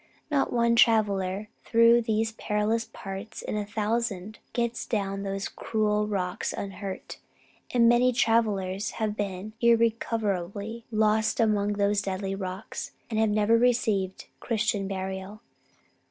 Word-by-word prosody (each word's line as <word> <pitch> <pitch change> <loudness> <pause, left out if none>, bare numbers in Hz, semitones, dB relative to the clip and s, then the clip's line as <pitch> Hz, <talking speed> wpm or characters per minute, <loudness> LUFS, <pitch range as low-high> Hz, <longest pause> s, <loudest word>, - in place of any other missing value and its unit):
Not 280 -2 +2
one 235 -1 +3
traveller 205 -3 +3 0.2
through 230 +1 +5
these 225 0 0
perilous 220 +1 -1
parts 195 +3 -7
in - - -3
a 210 -1 -2
thousand 215 -1 -2
gets 235 0 -2
down 195 -3 -1
those 195 0 -3
cruel 210 -1 0
rocks 185 -3 -2
unhurt; 195 -1 -6 0.5
and 235 -2 +4
many 240 +2 +5
travellers 210 -5 +1
have 215 -2 -1
been 200 0 -4
irrecoverably 225 -2 0
lost 215 +1 +2
among 210 -2 +2
those 205 0 +1
deadly 195 0 -3
rocks, 190 +1 -5 0.2
and 220 - 0
have 220 -1 +3
never 215 +2 +3
received 220 -6 +1
Christian 215 -3 0
burial. 190 +2 -5
210 Hz, 125 wpm, -27 LUFS, 195-230 Hz, 0.5 s, through